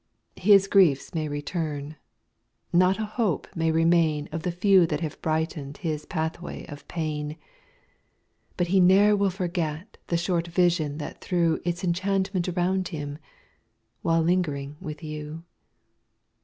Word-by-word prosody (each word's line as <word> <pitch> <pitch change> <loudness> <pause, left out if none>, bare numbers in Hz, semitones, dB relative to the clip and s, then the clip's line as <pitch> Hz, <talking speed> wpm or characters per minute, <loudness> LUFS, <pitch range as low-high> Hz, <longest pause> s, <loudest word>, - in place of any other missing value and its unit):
5 - - -14
His 195 -2 +7
griefs 180 -9 +3
may 155 -2 -1
return, 145 0 -4 0.8
not 185 +2 +4
a 220 - -2
hope 210 - -1
may 165 0 +1
remain 160 -2 +2
Of 160 +1 -3
the 180 - -1
few 185 0 +4
that 150 0 -2
have 155 -3 -5
brighten 155 -3 -2
'd - - -16
his 155 -4 -3
pathway 160 +2 -4
of 145 -2 -11
pain, 150 -2 -3 1.2
But 175 -1 0
he 190 +1 +4
ne'er 195 +3 +6
will 200 -1 +2
forget 175 -1 -3
the 170 - +1
short 170 0 0
vision 170 -4 +1
that 150 -1 -7
threw 170 -3 +1
Its 175 +1 -2
enchantment 190 +1 0
around 180 +1 0
him, 150 -3 -6 0.8
while 165 0 +2
lingering 150 -5 0
with 155 -3 -7
you. 155 +1 -6
170 Hz, 140 wpm, -26 LUFS, 155-185 Hz, 1.2 s, His